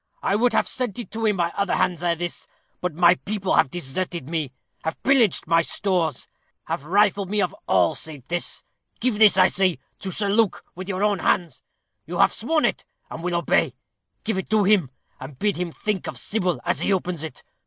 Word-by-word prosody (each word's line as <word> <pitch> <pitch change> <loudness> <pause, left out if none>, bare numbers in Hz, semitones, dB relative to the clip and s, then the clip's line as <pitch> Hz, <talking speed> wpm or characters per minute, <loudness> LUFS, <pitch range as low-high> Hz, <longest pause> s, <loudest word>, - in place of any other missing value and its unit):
I 195 - +2
would 235 +2 +2
have - - +2
sent 250 -6 -3
it 240 - -7
to 225 0 -1
him 210 -2 +1
by 170 -1 +1
other 200 -1 0
hands 175 -2 0
ere 170 -1 +2
this, 175 +1 -5 0.3
but 180 -4 -3
my 175 +1 +6
people 195 +1 -3
have - - +4
deserted 170 0 -4
me 155 -6 -2 0.3
have 160 - -2
pillaged 250 -8 +4
my 165 +1 +4
stores 175 -2 -1 0.4
have 140 - -4
rifled 200 +2 +2
me 210 +1 0
of 185 -3 0
all 90 -2 +3
save 145 -6 -8
this. 175 0 -4 0.4
Give 240 -4 0
this, 215 -3 +7
I 185 - +7
say, 185 -4 +2 0.2
to 195 - -5
Sir 200 +3 -1
Luke, 215 0 +1
with 185 +2 -8
your 190 +1 -1
own 205 -2 +2
hands. 175 -2 0 0.5
You - - -4
have - - +4
sworn 320 -2 +1
it, - - -1 0.3
and 165 - -6
will 175 0 -1
obey. 170 - +1 0.5
Give 220 -4 -1
it - - -6
to 215 -1 +3
him, 190 -8 +3 0.3
and 135 0 -9
bid 205 +4 0
him 175 -1 -3
think 205 +2 -3
of - - -5
Sybil 185 -5 -1
as - - +1
he - - 0
opens 180 -4 -1
it. 160 -5 -8
185 Hz, 205 wpm, -23 LUFS, 170-210 Hz, 0.5 s, this